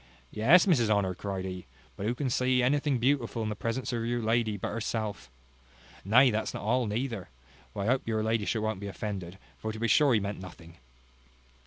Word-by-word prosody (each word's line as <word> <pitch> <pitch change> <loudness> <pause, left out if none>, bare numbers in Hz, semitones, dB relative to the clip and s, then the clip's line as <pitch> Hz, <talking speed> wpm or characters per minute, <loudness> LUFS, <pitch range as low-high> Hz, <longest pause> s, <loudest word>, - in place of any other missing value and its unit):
Yes, 140 +12 +5
Mrs 130 - +3
Honour, 100 -3 +2
cried 95 0 -4
he; 90 -6 -6 0.3
but 100 - -4
who 120 - 0
can 140 +1 -2
see 125 0 +2
anything 140 +1 +2
beautiful 120 -2 0
in 110 - -2
the 105 - -3
presence 115 +4 -3
of 115 -1 -1
your 120 +1 -1
lady 110 -1 +1
but - - -3
herself? 110 - -3 0.7
Nay, 125 +6 +5
that's 110 0 -2
not - - -5
all 120 +2 +1
neither; 110 - -3 0.5
but - - -3
I - - -2
hope 130 +2 +1
your 110 -1 0
ladyship 110 0 0
won't 110 -3 -2
be 100 - -6
offended, 95 -3 -5 0.2
for 110 - -3
to 110 - -7
be 115 +1 0
sure 140 -1 +5
he - - +3
meant 100 0 -4
nothing. 85 -3 -12
110 Hz, 200 wpm, -29 LUFS, 100-125 Hz, 0.7 s, Yes